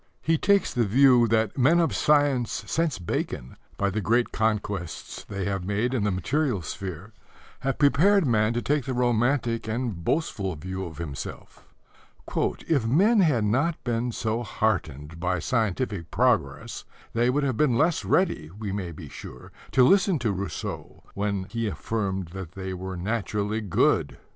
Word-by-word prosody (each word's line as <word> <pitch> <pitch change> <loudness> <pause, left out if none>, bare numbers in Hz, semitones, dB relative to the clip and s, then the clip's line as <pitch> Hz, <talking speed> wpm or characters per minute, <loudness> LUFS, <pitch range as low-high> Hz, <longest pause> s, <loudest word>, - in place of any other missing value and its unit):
He 165 - +3
takes 200 +5 +2
the 120 - +2
view 125 +2 +5
that 110 +1 +1
men 155 +7 +5
of 165 - +1
science 145 -5 +2
since 165 - 0
Bacon, 80 -7 -4 0.2
by 100 -1 +1
the 105 +3 -2
great 120 +4 +2
conquests 105 -5 -2
they 100 -2 -4
have 95 -2 -2
made 105 +6 -1
in 115 -6 0
the - - +2
material 120 - 0
sphere, 95 - -6 0.5
have 135 0 -1
prepared 165 +7 +4
man 110 -3 +2
to 120 - -2
take 145 -3 0
the 130 - -2
romantic 120 -1 +1
and 110 -6 -3
boastful 100 - -1
view 95 +5 -5
of 80 -4 -9
himself. 75 -5 -7 1.0
"If 140 -9 +1
men 200 - +4
had 150 - +3
not 135 +10 0
been 120 0 -1
so 110 +1 -2
heartened 85 - -2
by 90 +1 0
scientific 105 -3 -1
progress 95 - 0 0.3
they 120 +2 +2
would 145 +3 +1
have 130 -4 0
been 130 -6 +3
less 160 +3 +2
ready, 80 - +1
we 100 +3 -6
may 95 -3 -3
be 80 - -9
sure, 65 - -10 0.2
to 130 - +6
listen 190 +4 +4
to 115 -5 0
Rousseau 95 -3 -5
when 100 -1 -1
he 115 +3 -3
affirmed 95 +1 -3
that 90 -2 -8
they 95 -1 -5
were 95 0 -5
naturally 105 +2 -2
good." 100 -5 +1
110 Hz, 160 wpm, -26 LUFS, 95-130 Hz, 1.0 s, to